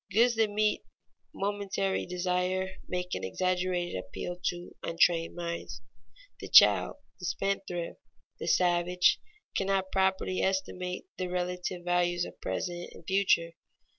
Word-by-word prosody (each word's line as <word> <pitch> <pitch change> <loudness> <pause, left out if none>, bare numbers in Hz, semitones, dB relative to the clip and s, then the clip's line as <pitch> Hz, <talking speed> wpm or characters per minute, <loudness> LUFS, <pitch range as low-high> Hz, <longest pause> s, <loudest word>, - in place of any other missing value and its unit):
Goods 235 +5 +5
that 220 -1 +3
meet 210 +1 +1 0.5
momentary 195 -1 -1
desire 180 +1 -1
make 180 0 -3
an - - -3
exaggerated 180 - -1
appeal 115 - -5
to 175 0 -3
untrained 165 0 +2
minds. 170 -7 -5 0.6
The - - -7
child, - - +7 0.2
the 180 - -6
spendthrift, 190 -1 -2 0.4
the - - -5
savage, 180 0 +3 0.4
cannot 195 -1 0
properly 190 -1 +1
estimate 185 - -2
the 185 - -1
relative 180 0 -3
values 175 0 +1
of - - -11
present 175 - -3
and 165 - -14
future. 190 -3 +2
180 Hz, 120 wpm, -30 LUFS, 175-190 Hz, 0.6 s, child